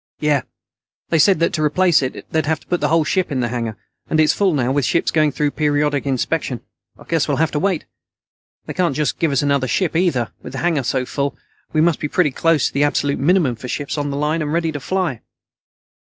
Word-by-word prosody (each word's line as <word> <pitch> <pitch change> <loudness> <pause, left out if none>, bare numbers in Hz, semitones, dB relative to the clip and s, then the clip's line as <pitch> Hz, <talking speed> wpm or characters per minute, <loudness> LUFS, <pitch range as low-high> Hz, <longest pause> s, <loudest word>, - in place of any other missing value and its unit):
"Yeah. 150 -3 +2 0.7
They 165 - +2
said 190 +5 +5
that 170 - +2
to 155 - -1
replace 170 +2 +3
it 130 - -4
they'd 160 -1 0
have 160 0 +1
to - - -21
put 175 - -1
the 165 0 +3
ship 185 +2 0
in 135 - -1
the 120 - -1
hangar, 115 -2 -3 0.3
and 155 - +1
it's 155 -1 +4
full 200 -2 +2
now 130 -2 +1
with 140 +1 +1
ships 170 - +1
going 155 -2 +2
through 145 +1 0
periodic 145 -2 0
inspection. 135 -1 -1 0.4
I - - -14
guess 165 -3 0
we'll 145 -3 0
have 160 +1 +1
to 150 - -1
wait. 185 -2 0 0.8
They - - -5
can't 175 -7 0
just 150 -1 -1
give 165 -3 +1
us 140 0 +1
another 140 -2 +1
ship, 180 +5 0
either. 160 -10 +1
With - - -9
the - - -5
hangar 165 -5 +2
full, 135 +3 -1 0.3
we 155 - +2
must 170 0 +2
be 150 - -2
pretty 150 -1 +1
close 165 0 +2
to - - -1
the 140 - +2
absolute 145 -1 0
minimum 155 -4 +2
for 120 +3 -8
ships 145 +3 -3
on 145 -1 -2
the 140 - -3
line 150 +3 0
and 150 -1 -2
ready 165 0 0
to 145 - -5
fly." 175 - -2
150 Hz, 230 wpm, -20 LUFS, 140-165 Hz, 0.8 s, said